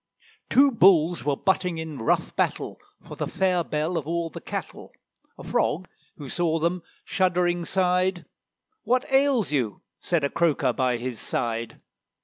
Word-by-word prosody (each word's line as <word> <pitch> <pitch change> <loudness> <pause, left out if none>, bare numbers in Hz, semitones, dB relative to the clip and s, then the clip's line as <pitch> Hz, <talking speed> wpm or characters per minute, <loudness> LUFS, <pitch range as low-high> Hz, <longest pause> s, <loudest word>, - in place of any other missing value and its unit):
Two 275 +3 +5
Bulls 175 -6 +4
were 145 -1 +1
butting 180 -3 0
in 160 -4 -6
rough 115 - 0
battle, - - -1 0.2
For - - -10
the - - -3
fair 185 -2 +1
belle 155 +3 -2
of 150 - -9
all 170 0 -2
the - - -8
cattle; - - -6 0.5
A - - -10
Frog, 180 +4 0 0.3
who 145 - -8
saw 165 +3 0
them, 170 +3 0 0.2
shuddering 175 -2 +1
sighed. 180 -1 +1 0.6
"What 250 +1 +1
ails 270 - +3
you?" 125 -8 -1 0.2
said 170 -4 0
a 140 - +1
croaker 170 -3 +1
by 130 -2 0
his 120 -1 -5
side. 115 -1 -3
170 Hz, 150 wpm, -25 LUFS, 150-185 Hz, 0.6 s, Two